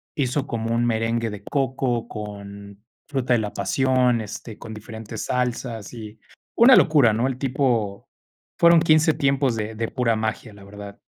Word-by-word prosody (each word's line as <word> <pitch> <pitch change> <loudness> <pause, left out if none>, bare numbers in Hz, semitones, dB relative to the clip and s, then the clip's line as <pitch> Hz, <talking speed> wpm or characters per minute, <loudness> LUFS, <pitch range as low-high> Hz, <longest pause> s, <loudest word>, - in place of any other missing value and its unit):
hizo 140 0 -1
como 115 0 -2
un 120 0 +1
merengue 115 0 0
de 105 -1 -8
coco 130 -3 -1
con 100 -1 -9 0.2
fruta 130 -3 0
de 120 - +3
la 105 -1 -4
pasión, 130 -3 +1
este, 110 +1 -8
con 110 - -9
diferentes 110 0 -8
salsas 120 -3 -3
y 110 -1 -10 0.4
una 250 +3 +8
locura, 140 -9 +5
¿no?, 120 +4 0
el 130 -1 -3
tipo 125 -7 -1 0.5
Fueron 170 -1 +6
15 155 -1 +4
tiempos 135 -3 +1
de 110 +1 -4
de 115 0 -2
pura 120 -3 0
magia, 110 0 -4
la 100 -1 -15
verdad. 100 0 -10
115 Hz, 160 wpm, -23 LUFS, 110-130 Hz, 0.5 s, una